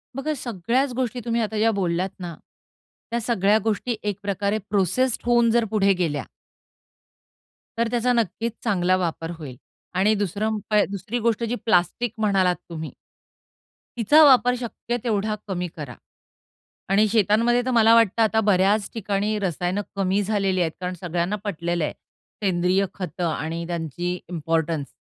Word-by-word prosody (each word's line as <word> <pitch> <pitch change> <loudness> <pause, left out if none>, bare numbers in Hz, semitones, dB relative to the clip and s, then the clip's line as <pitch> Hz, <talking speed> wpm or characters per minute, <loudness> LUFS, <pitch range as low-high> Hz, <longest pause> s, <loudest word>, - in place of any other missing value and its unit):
बघा 275 +3 -2
सगळ्याच 245 +4 -1
गोष्टी 250 -1 -2
तुम्ही 235 0 0
आता 220 0 -2
ज्या 225 +1 +3
बोललात 185 -2 -1
ना, 175 -2 -6 0.8
त्या 235 - 0
सगळ्या 210 -2 +2
गोष्टी 225 +2 -1
एक 205 -2 -2
प्रकारे 200 +1 0
प्रोसेस्ड 215 +6 +1
होऊन 240 -1 +4
जर 235 0 +3
पुढे 200 -2 +3
गेल्या 160 -5 -1 1.5
तर 235 0 +2
त्याचा 245 +1 +2
नक्कीच 230 0 -1
चांगला 185 -5 +2
वापर 165 -2 -3
होईल 145 -6 -8 0.4
आणि 205 +3 +4
2रा 205 +1 -1
उपाय 215 -1 +1
2री 200 +4 -4
गोष्ट 230 0 0
जी 230 +1 -1
प्लास्टिक 220 +3 +1
म्हणालात 195 -4 +2
तुम्ही 160 -2 -6 1.1
तिचा 265 +8 +6
वापर 250 -3 +6
शक्य 240 0 -4
तेवढा 215 -2 0
कमी 180 -2 -2
करा 140 -6 -7 1.0
आणि 210 +2 +4
शेतांमध्ये 225 +3 +3
तर 255 - 0
मला 230 -2 +5
वाटतं, 230 -1 +3
आता 220 0 +3
बऱ्याच 200 0 +2
ठिकाणी 210 0 -1
रसायन 180 0 -1 0.2
कमी 195 +1 +1
झालेली 195 -2 0
आहेत. 165 -2 +1
कारण 180 0 -2
सगळ्यांना 175 +2 -1
पटलेलं 170 -4 -2
आहे, - - -4 0.5
सेंद्रिय 185 +1 +2
खतं 180 -2 -3
आणि 160 +2 -3
त्यांची 175 +1 -3
इम्पोर्टन्स. 160 -3 -1
200 Hz, 145 wpm, -23 LUFS, 180-230 Hz, 1.5 s, तिचा